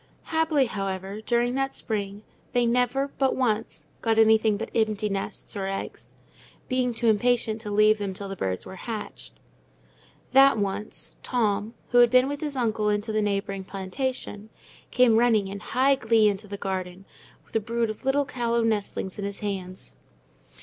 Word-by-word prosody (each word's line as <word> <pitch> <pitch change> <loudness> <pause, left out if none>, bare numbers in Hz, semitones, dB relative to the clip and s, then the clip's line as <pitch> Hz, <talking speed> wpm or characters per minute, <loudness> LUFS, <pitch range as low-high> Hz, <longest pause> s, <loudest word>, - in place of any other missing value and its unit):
Happily, 320 -4 +3
however, 195 -1 -4
during 240 +1 +1
that 270 +1 -1
spring, 205 -2 -4 0.3
they 245 -1 +3
never, 250 +3 +1
but 270 -1 +2
once, 215 - -1 0.2
got 225 -1 +1
anything 220 -1 +5
but 225 - -5
empty 215 -2 +1
nests, 195 +2 -4
or 195 -1 -2
eggs—being 250 +5 -5
too 235 - -3
impatient 225 0 +2
to 210 - -6
leave 215 +1 +4
them 200 -1 -2
till 200 +1 -6
the 195 - -5
birds 95 - -3
were 190 - -9
hatched; 215 +1 -7 1.0
that 270 -1 +7
once, 200 0 -4
Tom, 215 -2 -1 0.2
who 245 - +5
had 240 -1 +7
been 255 +2 +5
with 285 0 -4
his 295 -2 -3
uncle 220 -4 0
into 210 +1 -1
the 215 0 +1
neighbouring 200 -1 -2
plantation, 205 +2 -4 0.4
came 250 -3 +4
running 225 -4 +3
in 200 +1 -6
high 260 +6 +2
glee 225 -4 +3
into 205 0 -2
the 200 0 -6
garden, 190 -1 -4 0.4
with - - -21
a - - +4
brood 230 +1 -1
of 215 - -11
little 280 +2 +2
callow 235 -3 0
nestlings 210 -3 -2
in - - -3
his 200 0 -6
hands. 185 - -5
220 Hz, 165 wpm, -26 LUFS, 200-245 Hz, 1.0 s, that